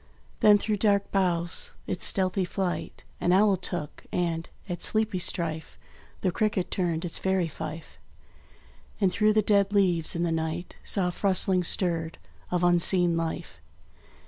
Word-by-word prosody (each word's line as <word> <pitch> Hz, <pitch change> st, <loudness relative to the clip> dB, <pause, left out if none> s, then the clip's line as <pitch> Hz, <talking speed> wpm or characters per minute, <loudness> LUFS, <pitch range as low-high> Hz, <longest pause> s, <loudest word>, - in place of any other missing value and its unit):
Then 210 Hz, -1 st, +6 dB
through 210 Hz, +1 st, -2 dB
dark 200 Hz, -1 st, +1 dB
boughs 175 Hz, -3 st, -1 dB
its 180 Hz, -, 0 dB
stealthy 190 Hz, 0 st, +1 dB
flight 180 Hz, 0 st, -4 dB, 0.2 s
An 175 Hz, -, +1 dB
owl 200 Hz, +2 st, +4 dB
took; 175 Hz, -4 st, -6 dB
and, 165 Hz, -2 st, -2 dB, 0.2 s
at 175 Hz, -2 st, -5 dB
sleepy 215 Hz, -3 st, +3 dB
strife, 160 Hz, -2 st, -2 dB, 0.4 s
The 185 Hz, -, +1 dB
cricket 200 Hz, -1 st, -1 dB
turned 170 Hz, -2 st, -1 dB
its 170 Hz, -, -3 dB
fairy 190 Hz, -2 st, 0 dB
fife; 160 Hz, +1 st, -8 dB, 1.0 s
And 195 Hz, -3 st, +2 dB
through 215 Hz, +2 st, +2 dB
the 215 Hz, 0 st, +2 dB
dead 200 Hz, -1 st, +2 dB
leaves, 180 Hz, -6 st, +3 dB
in 170 Hz, -, -1 dB
the 170 Hz, -, 0 dB
night, 160 Hz, +2 st, -3 dB
Soft 180 Hz, -2 st, -1 dB
rustlings 185 Hz, -2 st, +2 dB
stirred 165 Hz, -3 st, -1 dB, 0.3 s
of 180 Hz, -1 st, -1 dB
unseen 175 Hz, 0 st, +4 dB
life. 165 Hz, -, -4 dB
180 Hz, 145 wpm, -27 LUFS, 170-195 Hz, 1.0 s, Then